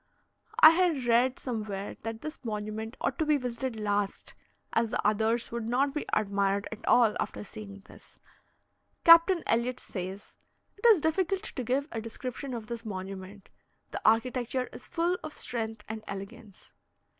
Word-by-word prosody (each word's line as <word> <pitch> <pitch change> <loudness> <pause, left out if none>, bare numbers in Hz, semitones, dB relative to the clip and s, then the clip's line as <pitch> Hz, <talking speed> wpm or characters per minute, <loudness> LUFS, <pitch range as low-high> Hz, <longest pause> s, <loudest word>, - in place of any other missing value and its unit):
I 315 - +11
had 330 -6 +2
read 240 +2 +3
somewhere 210 -5 -4
that 225 0 -5
this 310 -1 -7
monument 215 +1 -4
ought - - -1
to 315 - +2
be 300 -1 +4
visited 245 -2 -4
last, 205 -1 -1 0.4
as 225 0 +2
the - - -2
others 220 +3 +1
would 230 -1 -3
not 270 +3 +2
be 300 - -3
admired 200 -1 +1
at 220 +1 -8
all 235 -3 +5
after - - -3
seeing 200 -1 -10
this. - - -16 0.8
Captain 335 +2 +7
Elliot 245 +2 +1
says: 190 +1 -7 0.4
"It 445 +4 +2
is 425 -8 +7
difficult 370 +5 0
to 260 - -4
give 265 +5 0
a 225 - -3
description 250 +3 -6
of 225 -2 -6
this 230 +1 -6
monument; 195 -1 -7 0.4
the - - -4
architecture 250 +3 +1
is - - -10
full 345 +2 0
of 310 - -6
strength 225 -3 -4
and 220 0 -6
elegance." 200 +1 -9
230 Hz, 155 wpm, -29 LUFS, 210-265 Hz, 0.8 s, I